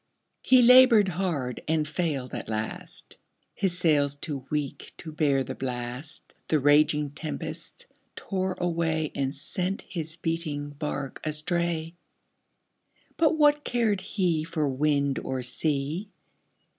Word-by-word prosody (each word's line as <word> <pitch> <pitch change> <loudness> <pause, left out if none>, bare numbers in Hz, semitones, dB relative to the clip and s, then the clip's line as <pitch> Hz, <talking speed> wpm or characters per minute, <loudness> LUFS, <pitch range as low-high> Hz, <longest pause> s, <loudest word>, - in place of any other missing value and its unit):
He 255 -1 +6
labored 245 -4 +8
hard 160 -9 -2
and 155 -1 +1
failed 150 -5 -2
at - - -5
last, 110 0 -5 0.4
His 190 -3 0
sails 145 -5 +3
too 145 -2 -6
weak 150 -2 -3
to 160 - -8
bear 145 -3 +2
the - - -5
blast, 125 +4 -5
The 155 - +2
raging 150 0 +4
tempests 155 - -7 0.3
tore 190 -1 -2
away 165 -3 0
And 135 +1 -2
sent 185 +7 -3
his 160 -3 -5
beating 165 -4 -3
bark 145 -2 -5
astray. 165 +1 0 1.2
But 320 0 +3
what 295 -1 +4
cared 225 -6 +1
he 180 -5 0
For 160 -2 -1
wind 140 0 +1
or 130 -1 -3
sea! 150 - -1
155 Hz, 120 wpm, -27 LUFS, 145-180 Hz, 1.2 s, labored